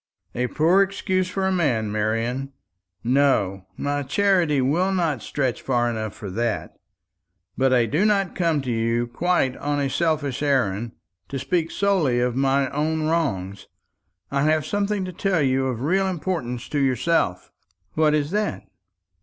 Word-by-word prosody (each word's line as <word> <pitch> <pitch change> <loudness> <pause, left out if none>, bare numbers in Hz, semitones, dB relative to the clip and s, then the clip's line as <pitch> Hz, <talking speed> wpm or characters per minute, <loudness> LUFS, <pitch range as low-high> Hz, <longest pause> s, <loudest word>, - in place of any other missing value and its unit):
"A 125 +1 -1
poor 165 +8 +3
excuse 190 -1 0
for 190 +1 -2
a 190 - +1
man, 125 - +1
Marian. 115 +6 -1 0.5
No, 115 -8 +1
my 145 0 -1
charity 170 0 +2
will 165 +9 +1
not 165 - 0
stretch 130 -1 -2
far 120 -2 +1
enough 110 -2 -4
for 100 -3 -7
that. 115 +2 -2 0.8
But 135 0 +2
I 125 -2 +4
do 150 - +1
not 200 -3 +2
come 165 -5 +1
to 130 -2 -3
you 115 +1 0
quite 135 +1 0
on 145 0 -1
a 140 -1 -1
selfish 155 -6 0
errand, 120 -6 0 0.4
to 140 - -3
speak 160 +5 -1
solely 175 -13 +1
of 125 0 0
my 135 0 +2
own 155 +2 -1
wrongs. 100 - -1 0.6
I 140 0 +1
have 155 -1 +2
something 205 +2 -1
to 185 - -6
tell 185 -3 +1
you 130 0 +1
of 125 -1 -3
real 190 +6 +2
importance 160 -9 -3
to 145 - -1
yourself." 130 - 0 0.4
"What 155 -1 +3
is 150 +1 -1
that?" 210 +1 -1
140 Hz, 155 wpm, -23 LUFS, 120-170 Hz, 0.8 s, I